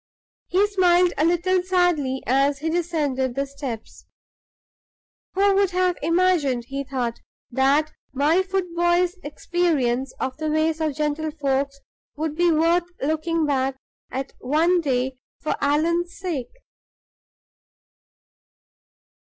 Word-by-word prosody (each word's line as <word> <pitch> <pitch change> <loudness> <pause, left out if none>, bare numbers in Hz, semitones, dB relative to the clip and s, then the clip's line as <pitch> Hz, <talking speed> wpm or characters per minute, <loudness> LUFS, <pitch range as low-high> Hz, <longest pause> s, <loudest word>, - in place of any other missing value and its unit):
He 380 +3 +3
smiled 360 -3 +3
a 295 - +1
little 350 +2 +2
sadly 355 -8 +1
as 275 +2 +2
he 320 +3 -2
descended 295 -7 -1
the 275 0 0
steps. 270 -5 -8 1.3
"Who 395 +1 +4
would 395 -1 +3
have 365 -1 +1
imagined," 330 -7 +2
he 275 +1 -3
thought, 250 -4 -3 0.3
"that 275 +5 +2 0.2
my 295 +7 +3
foot 375 -2 -3
boy's 345 +2 +2
experience 290 -5 0
of 260 - -3
the 310 0 -2
ways 315 +1 +1
of 310 -3 0
gentlefolks 290 -2 -1 0.3
would 305 0 -3
be 345 +1 +3
worth 335 +2 +2
looking 315 +2 0
back 270 -2 0 0.3
at 265 +1 -5
one 330 +7 +2
day 260 -3 -1 0.2
for 305 - -1
Allan's 335 +5 +1
sake?" 320 -10 -3
310 Hz, 115 wpm, -23 LUFS, 275-350 Hz, 1.3 s, Who